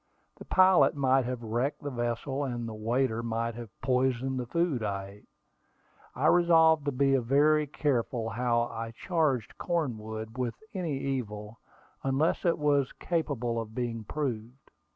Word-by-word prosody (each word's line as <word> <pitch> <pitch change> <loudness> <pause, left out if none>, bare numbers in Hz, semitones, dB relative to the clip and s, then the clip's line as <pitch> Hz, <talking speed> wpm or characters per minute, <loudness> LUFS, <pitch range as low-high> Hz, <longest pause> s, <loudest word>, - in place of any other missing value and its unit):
The - - -11
pilot 185 -8 +5
might 135 -2 +3
have 125 -1 -4
wrecked 120 +7 -2
the 145 - -3
vessel, 120 +3 -2
and 120 -3 -3
the 110 - -6
waiter 115 +2 0
might 115 0 -2
have 115 -1 -8
poisoned 130 0 +1
the 125 - -4
food 170 -3 0
I 100 -2 -2
ate. 100 +1 -14 0.9
I - - -1
resolved 160 -3 +5
to 145 - +1
be 135 +1 +2
very 145 +5 +3
careful 125 -5 -1
how 120 0 +1
I 115 -1 -5
charged 155 - 0
Cornwood 110 -8 -3
with 120 -2 -1 0.2
any 170 -8 -2
evil, 110 -6 -4 0.4
unless 135 +7 +1
it 170 - +3
was 145 -3 +1
capable 125 -9 -2
of 110 0 -9
being 120 -3 -3
proved. 125 -1 -5
125 Hz, 150 wpm, -29 LUFS, 115-145 Hz, 0.9 s, pilot